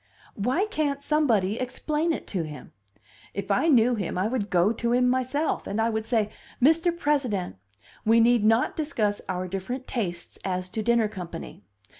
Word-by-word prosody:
"Why 255 Hz, -, 0 dB
can't 290 Hz, -8 st, -2 dB
somebody 235 Hz, -10 st, +2 dB
explain 300 Hz, +6 st, -1 dB
it -, -, -3 dB
to 185 Hz, -, -1 dB
him? 155 Hz, -2 st, -8 dB, 0.6 s
If 200 Hz, +1 st, -3 dB
I 200 Hz, +11 st, +2 dB
knew 250 Hz, -5 st, +5 dB
him, 200 Hz, -6 st, -3 dB
I 185 Hz, +3 st, +1 dB
would 225 Hz, -4 st, -2 dB
go 180 Hz, +3 st, +3 dB
to 235 Hz, +1 st, -1 dB
him 250 Hz, 0 st, +3 dB
myself, 260 Hz, +5 st, 0 dB
and 205 Hz, -, -2 dB
I 225 Hz, +1 st, +2 dB
would 220 Hz, 0 st, -3 dB
say, 220 Hz, -3 st, +1 dB, 0.3 s
Mr. 325 Hz, +6 st, +4 dB
President, 255 Hz, -, 0 dB, 0.5 s
we 225 Hz, +1 st, +5 dB
need 235 Hz, -1 st, +4 dB
not 225 Hz, +3 st, +3 dB
discuss 220 Hz, -10 st, -1 dB
our 185 Hz, 0 st, -2 dB
different 195 Hz, +8 st, -4 dB
tastes 175 Hz, -8 st, -4 dB
as 185 Hz, -1 st, -2 dB
to 220 Hz, -, -3 dB
dinner 235 Hz, 0 st, +3 dB
company. 175 Hz, -, -8 dB
225 Hz, 170 wpm, -26 LUFS, 200-260 Hz, 0.6 s, knew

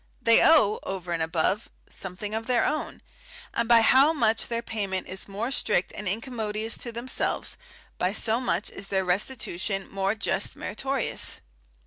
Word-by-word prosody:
They 230 Hz, -1 st, +5 dB
owe, 215 Hz, -10 st, +5 dB
over 185 Hz, -2 st, -5 dB
and 165 Hz, -1 st, 0 dB
above, 170 Hz, +6 st, 0 dB, 0.2 s
something 195 Hz, +3 st, -6 dB
of 225 Hz, +1 st, -3 dB
their 245 Hz, -3 st, +3 dB
own; 310 Hz, -, -3 dB, 0.5 s
and 235 Hz, 0 st, -1 dB
by 235 Hz, -1 st, +7 dB
how 270 Hz, +7 st, +6 dB
much 225 Hz, -6 st, +1 dB
their 235 Hz, 0 st, -2 dB
payment 200 Hz, -5 st, -3 dB
is 190 Hz, +1 st, -1 dB
more 210 Hz, +6 st, -3 dB
strict 185 Hz, -8 st, 0 dB
and 210 Hz, -, -5 dB
incommodious 220 Hz, +1 st, -2 dB
to 235 Hz, -, -6 dB
themselves, 235 Hz, +3 st, -2 dB, 0.4 s
by 180 Hz, -, +2 dB
so 220 Hz, +2 st, 0 dB
much 255 Hz, -, -1 dB
is 195 Hz, -, -6 dB
their 190 Hz, -1 st, 0 dB
restitution 195 Hz, 0 st, -1 dB
more 195 Hz, +1 st, 0 dB
just 200 Hz, -2 st, 0 dB
meritorious. 270 Hz, +7 st, -2 dB
215 Hz, 155 wpm, -26 LUFS, 190-235 Hz, 0.5 s, by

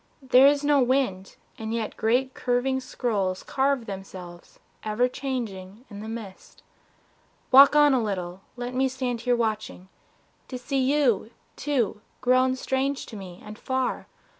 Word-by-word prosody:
There 260 Hz, +1 st, +6 dB
is 285 Hz, 0 st, +3 dB
no 290 Hz, -1 st, +4 dB
wind, 245 Hz, -7 st, 0 dB, 0.2 s
and 220 Hz, +1 st, -3 dB
yet 225 Hz, -2 st, -3 dB
great 255 Hz, +4 st, +1 dB
curving 255 Hz, +2 st, 0 dB
scrolls 205 Hz, -7 st, -2 dB
Carve 270 Hz, -2 st, 0 dB
themselves, 185 Hz, -3 st, -9 dB, 0.3 s
ever 215 Hz, +3 st, +1 dB
changing, 235 Hz, -5 st, -5 dB
in 200 Hz, -, -8 dB
the 220 Hz, +1 st, -7 dB
mist. 220 Hz, -4 st, -9 dB, 0.9 s
Walk 275 Hz, +3 st, +9 dB
on 295 Hz, -1 st, +6 dB
a 255 Hz, -, +2 dB
little, 185 Hz, -3 st, -4 dB
let 245 Hz, 0 st, -5 dB
me 265 Hz, +1 st, +2 dB
stand 255 Hz, -2 st, -3 dB
here 245 Hz, 0 st, +2 dB
watching 215 Hz, -5 st, -3 dB, 0.6 s
To 255 Hz, -, -6 dB
see 270 Hz, +2 st, -2 dB
you, 260 Hz, -5 st, +2 dB, 0.3 s
too, 245 Hz, -7 st, -1 dB, 0.2 s
grown 255 Hz, +1 st, +3 dB
strange 265 Hz, +1 st, -1 dB
to -, -, -10 dB
me 185 Hz, -3 st, -10 dB
and 210 Hz, +1 st, -10 dB
far... 260 Hz, -1 st, -2 dB
245 Hz, 145 wpm, -25 LUFS, 210-265 Hz, 0.9 s, Walk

